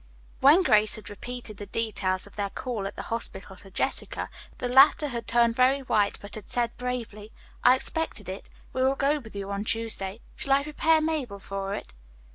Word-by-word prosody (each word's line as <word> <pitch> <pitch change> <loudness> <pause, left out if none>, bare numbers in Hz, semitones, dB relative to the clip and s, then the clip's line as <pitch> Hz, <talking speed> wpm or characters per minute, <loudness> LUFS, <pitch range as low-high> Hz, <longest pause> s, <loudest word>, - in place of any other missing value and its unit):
When 300 +8 +7
Grace 215 -8 +4
had 215 - -9
repeated 235 0 -7
the 205 - -7
details 195 -4 -1
of 200 - -15
their 200 -1 -1
call 215 -3 -3
at 200 - -8
the - - -5
hospital 200 -4 -5
to 195 - -14
Jessica, 190 - -2 0.3
the 250 - -2
latter 275 +4 +6
had 235 -2 -5
turned 235 -1 +3
very 260 +3 +4
white, 210 -6 +1
but 205 - -11
had 215 -3 -9
said 240 -1 0
bravely, 230 -4 -5 0.3
"I 250 - +8
expected 265 - -3
it. 190 +1 -7 0.2
We 260 - -1
will 265 +1 +3
go 285 +2 +2
with 220 -6 -13
you 200 0 -4
on 200 +1 -2
Tuesday. 220 -2 -2
Shall 275 - +1
I 280 +1 +4
prepare 315 +2 +3
Mabel 300 -10 -1
for 195 0 -4
it?" - - -8
230 Hz, 195 wpm, -27 LUFS, 200-260 Hz, 0.3 s, I